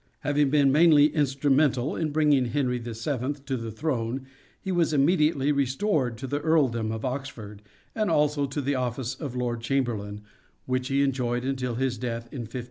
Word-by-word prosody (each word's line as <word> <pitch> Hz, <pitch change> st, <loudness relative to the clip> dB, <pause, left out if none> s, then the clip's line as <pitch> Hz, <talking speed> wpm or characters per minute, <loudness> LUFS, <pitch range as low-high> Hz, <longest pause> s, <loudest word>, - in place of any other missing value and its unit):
Having 145 Hz, -1 st, +2 dB
been 140 Hz, -1 st, +4 dB
mainly 150 Hz, -1 st, +5 dB
instrumental 140 Hz, -1 st, +1 dB
in 160 Hz, -2 st, -1 dB
bringing 145 Hz, -3 st, +3 dB
Henry 125 Hz, -1 st, -1 dB
(VII) 120 Hz, +4 st, -3 dB
to 135 Hz, -1 st, -2 dB
the 115 Hz, -2 st, -5 dB
throne 130 Hz, 0 st, -2 dB, 0.3 s
he 190 Hz, -, -4 dB
was 170 Hz, -3 st, +1 dB
immediately 150 Hz, -1 st, +3 dB
restored 135 Hz, -, 0 dB
to 130 Hz, -, -6 dB
the 145 Hz, +2 st, -2 dB
149 145 Hz, -7 st, +1 dB
Earldom -, -, -2 dB
of 110 Hz, +1 st, -4 dB
Oxford, 125 Hz, -6 st, -6 dB, 0.3 s
and 215 Hz, -2 st, 0 dB
also 150 Hz, -2 st, +2 dB
to 135 Hz, +2 st, -3 dB
the 140 Hz, +1 st, 0 dB
office 125 Hz, -1 st, -2 dB
of 130 Hz, -2 st, -6 dB
Lord 120 Hz, -2 st, -2 dB
Chamberlain 115 Hz, -5 st, -2 dB, 0.4 s
which 130 Hz, 0 st, -1 dB
he 140 Hz, +1 st, +2 dB
enjoyed 125 Hz, -2 st, -1 dB
until 130 Hz, -3 st, -2 dB
his 130 Hz, 0 st, -1 dB
death 120 Hz, -2 st, -3 dB
in 135 Hz, -, -5 dB
1513." 125 Hz, -, -5 dB
135 Hz, 175 wpm, -26 LUFS, 120-145 Hz, 0.4 s, mainly